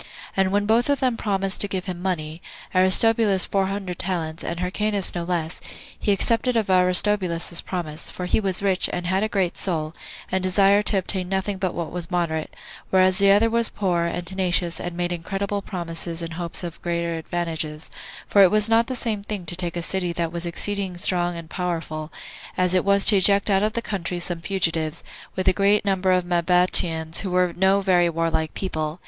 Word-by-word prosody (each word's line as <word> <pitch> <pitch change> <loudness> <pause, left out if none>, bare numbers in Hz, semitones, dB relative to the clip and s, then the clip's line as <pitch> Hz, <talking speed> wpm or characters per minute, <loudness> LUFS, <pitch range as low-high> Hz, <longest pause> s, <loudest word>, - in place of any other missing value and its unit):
And 190 -1 +1
when 205 +1 +1
both 230 +5 +2
of 285 - +2
them 255 -3 +1
promised 195 -3 +1
to 205 - +3
give 190 -2 -4
him 180 -2 -6
money, 165 -3 -3 0.3
Aristobulus 195 +2 +4
four 195 -1 0
hundred 190 -3 -5
talents, 165 -3 -3
and 170 0 -4
Hyrcanus 200 +2 +1
no 175 - -3
less, 170 -1 -3 0.4
he 205 - 0
accepted 230 +4 +1
of 215 -4 0
Aristobulus's 180 -2 +3
promise, 165 -4 -5
for 180 - -6
he 180 - +1
was 195 -2 0
rich, 190 -2 +3
and 175 0 -4
had 190 +2 0
a 215 - 0
great 190 -4 -1
soul, 160 -4 -2 0.4
and 190 - 0
desired 195 +2 +3
to 205 - +4
obtain 185 -1 -2
nothing 190 0 -2
but 185 -2 -2
what 170 -2 -4
was 175 0 -5
moderate; 170 -3 -2 0.4
whereas 185 +1 +3
the 200 0 +4
other 205 +3 +5
was 230 0 +1
poor, 175 -4 -1
and 170 +1 -3
tenacious, 180 -2 0
and 175 -1 -6
made 175 0 -2
incredible 195 +4 -3
promises 170 -3 -5
in 165 - -6
hopes 170 +1 -4
of 170 -2 -7
greater 170 -1 -2
advantages; 160 -2 -4 0.4
for 200 - +4
it 190 - +7
was 210 +1 +3
not 230 +1 +3
the 260 - -3
same 225 -4 -2
thing 200 -3 -6
to 175 - -2
take 175 -1 -4
a 170 - -3
city 180 -1 -2
that 170 -1 -2
was 170 0 -4
exceeding 190 +1 0
strong 175 -1 +1
and 165 -1 -9
powerful, 165 -3 -4 0.5
as 180 0 +1
it 185 - +2
was 200 0 +3
to 205 - +6
eject 200 +2 +4
out 195 0 +3
of 215 +1 0
the 235 - -3
country 180 -5 -4
some 175 -1 -3
fugitives, 165 -4 -1 0.3
with 185 - -3
a - - +5
greater 200 +2 +2
number 190 -1 +1
of 180 -1 +2
Mabateans, 170 -2 +2
who 195 - -3
were 180 -1 +1
no 190 +2 +3
very 180 -3 +3
warlike 165 -1 -1
people. 155 -3 -4
185 Hz, 200 wpm, -23 LUFS, 170-200 Hz, 0.5 s, it